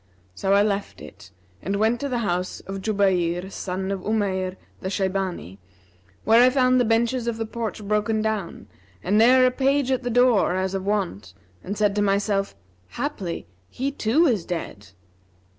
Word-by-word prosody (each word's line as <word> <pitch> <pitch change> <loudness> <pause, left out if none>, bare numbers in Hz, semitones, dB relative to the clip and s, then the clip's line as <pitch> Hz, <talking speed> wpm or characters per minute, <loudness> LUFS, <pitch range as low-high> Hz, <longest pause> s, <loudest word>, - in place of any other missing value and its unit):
So 195 - 0
I 200 - +5
left 205 -1 -2
it - - -13 0.3
and 195 +4 -2
went 220 +3 +2
on - - -4
to 280 - -3
the 250 - -1
house 180 0 -2
of 195 0 -7
Jubayr, 190 -3 0
son 190 +1 -4
of 195 - -2
Umayr 190 -2 -1 0.2
the 190 - -4
Shaybani, 190 - -3 0.6
where 225 +2 +5
I 250 - +6
found 255 -1 +3
the - - +2
benches 235 +2 +1
of 235 -1 -1
the 225 - -2
porch 220 -2 -5
broken 210 +1 +1
down 215 -5 -3 0.4
and 195 - 0
ne'er 255 +3 +6
a 255 - +3
page 270 +1 +1
at 260 - +1
the 245 - -3
door, 245 -6 +3
as 190 0 -1
of 195 0 -3
wont 175 - -2 0.3
and 200 +2 -5
said 205 -1 +2
to - - +2
myself, 200 - 0 0.4
'Haply 195 - -4 0.2
he 270 +2 -3
too 280 +5 +2
is 225 - +1
dead.' 155 - -6
205 Hz, 175 wpm, -24 LUFS, 190-235 Hz, 0.6 s, I